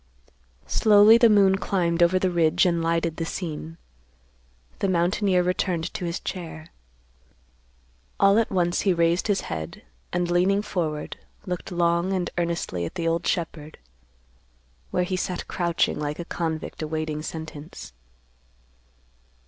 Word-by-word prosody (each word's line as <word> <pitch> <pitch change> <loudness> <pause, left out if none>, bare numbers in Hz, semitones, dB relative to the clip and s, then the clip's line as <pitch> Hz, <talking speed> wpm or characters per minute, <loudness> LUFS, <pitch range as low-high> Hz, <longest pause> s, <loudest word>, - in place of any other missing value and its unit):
Slowly 215 +1 +6
the 235 -2 +6
moon 195 -2 +5
climbed 175 -3 0
over 175 +2 +5
the 185 0 +1
ridge 165 0 +3
and 170 -2 +1
lighted 165 0 0
the 165 - -2
scene. 165 -1 -5 1.0
The 195 - +1
mountaineer 180 +1 +2
returned 180 -2 -1
to 180 - -4
his 170 0 -3
chair. 165 -3 -7 1.5
All 200 +2 +5
at 230 - 0
once 175 -2 +1
he 190 -3 +2
raised 170 +3 +2
his 205 -2 +1
head, 80 -1 -6 0.3
and, 175 0 -1
leaning 190 +4 +2
forward, 155 -7 -3 0.3
looked 180 0 -5
long 170 +1 +1
and 185 -2 -2
earnestly 170 - -2
at 85 - -5
the 165 - -2
old 165 +1 0
shepherd, 160 -3 -3 1.1
where 180 - 0
he 185 +1 -2
sat 180 -1 -3
crouching 170 -4 0
like 150 0 -3
a 175 - -6
convict 160 -2 -4
awaiting 155 -1 -3
sentence. 155 - -8
175 Hz, 135 wpm, -25 LUFS, 165-185 Hz, 1.5 s, Slowly